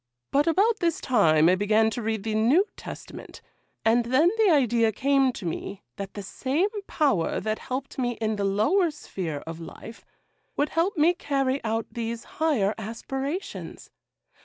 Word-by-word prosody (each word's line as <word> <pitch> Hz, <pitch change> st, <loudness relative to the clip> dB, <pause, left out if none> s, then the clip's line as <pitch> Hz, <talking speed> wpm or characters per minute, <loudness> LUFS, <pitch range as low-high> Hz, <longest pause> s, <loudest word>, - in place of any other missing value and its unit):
But 290 Hz, +3 st, +2 dB
about 415 Hz, +7 st, +3 dB
this 335 Hz, -3 st, 0 dB
time 160 Hz, -10 st, +4 dB
I 180 Hz, -, +5 dB
began 215 Hz, +3 st, +2 dB
to 240 Hz, -, -4 dB
read 220 Hz, -2 st, -2 dB
the 220 Hz, 0 st, -2 dB
New 245 Hz, -, +4 dB
Testament, -, -, -9 dB, 0.5 s
and 230 Hz, +1 st, +4 dB
then 275 Hz, +9 st, +4 dB
the 435 Hz, -3 st, +5 dB
idea 240 Hz, -7 st, +3 dB
came 270 Hz, +3 st, +2 dB
to 190 Hz, -, -8 dB
me 190 Hz, +4 st, -5 dB
that 195 Hz, -1 st, -6 dB
the 205 Hz, -, -5 dB
same 275 Hz, -, -1 dB, 0.2 s
Power 270 Hz, -, +1 dB
that 215 Hz, 0 st, -2 dB
helped 265 Hz, +1 st, -5 dB
me 245 Hz, -1 st, 0 dB
in 220 Hz, -1 st, -2 dB
the 205 Hz, -, -2 dB
lower 220 Hz, -, +2 dB
sphere 175 Hz, -, -5 dB
of 165 Hz, 0 st, -7 dB
life 225 Hz, +7 st, -10 dB, 0.5 s
would 290 Hz, -, +1 dB
help 340 Hz, +4 st, 0 dB
me 320 Hz, +4 st, +5 dB
carry 275 Hz, -4 st, -1 dB
out 225 Hz, 0 st, -1 dB
these 230 Hz, -1 st, -4 dB, 0.2 s
higher 240 Hz, -11 st, +2 dB
aspirations. 270 Hz, -, -5 dB
240 Hz, 160 wpm, -26 LUFS, 215-295 Hz, 0.5 s, I